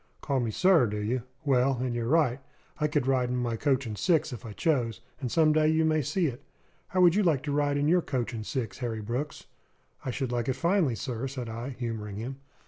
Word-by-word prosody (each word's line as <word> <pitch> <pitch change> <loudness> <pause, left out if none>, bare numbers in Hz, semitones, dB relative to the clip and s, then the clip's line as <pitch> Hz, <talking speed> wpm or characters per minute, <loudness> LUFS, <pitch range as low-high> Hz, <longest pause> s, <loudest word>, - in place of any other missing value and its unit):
"Call 140 -2 0
me 120 -2 0
'sir,' 165 - +4
do 105 0 -3
you? 115 +5 -1 0.2
Well, 135 -1 +3
and 125 -1 -1
you're 120 -1 -2
right. 140 -3 +3 0.4
I 150 - +2
could 145 -3 0
ride 130 -2 +2
in 125 - -1
my 120 -2 -1
coach 135 +2 +1
and 110 -2 -4
six 160 - +1
if 120 0 -8
I - - -7
chose; 120 -3 0 0.2
and 125 -4 -3
some 155 -2 +4
day 155 0 +3
you 160 +1 +3
may 155 -1 +2
see 175 +6 0
it. 130 -3 -3 0.5
How 185 - +1
would 175 -2 +7
you 210 - +3
like 160 -8 +2
to 145 - -2
ride 145 0 +1
in 145 +1 +1
your 175 +3 +4
coach 125 -5 -2
and 110 -2 -4
six, 115 -3 -4
Harry 115 -3 -3
Brooks?" 125 +7 -4 0.6
"I - - -3
should 130 0 -2
like 120 0 -1
it - - +2
finely, 165 - +2
sir," 125 0 -3
said 130 -3 -5
I, 115 +3 -5
humouring 110 -4 -4
him. 125 +6 -5
130 Hz, 235 wpm, -28 LUFS, 120-150 Hz, 0.6 s, would